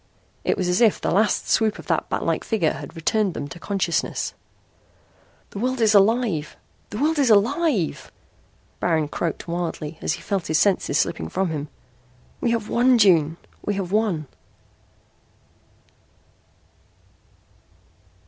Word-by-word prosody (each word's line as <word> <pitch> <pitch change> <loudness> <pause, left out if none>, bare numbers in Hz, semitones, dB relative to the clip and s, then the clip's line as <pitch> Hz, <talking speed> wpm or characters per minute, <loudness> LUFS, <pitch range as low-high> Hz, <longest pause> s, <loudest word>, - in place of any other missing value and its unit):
It - - 0
was 185 - -1
as 180 +5 +1
if 225 -4 +4
the - - -1
last 210 +5 +2
swoop 220 -2 +2
of - - -11
that - - -1
batlike - - -1
figure 200 -9 0
had 145 +1 -9
returned 190 +3 0
them 145 - -4
to 175 - -10
consciousness. 185 -3 -1 1.2
"The 200 - -6
world 255 +3 -1
is 220 -2 +4
alive! 205 -6 +2 0.3
The 210 - -6
world 305 +4 +1
is 270 -4 +3
alive!" 225 - +2 0.7
Baron 160 -4 +1
croaked 165 +2 -3
wildly 165 -2 -4
as - - 0
he - - -8
felt 195 -4 -2
his 155 - +2
senses 195 +3 +2
slipping 80 -1 -1
from 190 -3 -1
him. 150 -1 -4 0.7
"We 240 - +1
have 230 -2 -1
won, 245 +2 +4
June! 165 -7 +4 0.3
We 205 - -1
have 190 -2 -3
won!" 205 -8 +1
195 Hz, 140 wpm, -23 LUFS, 165-225 Hz, 1.2 s, if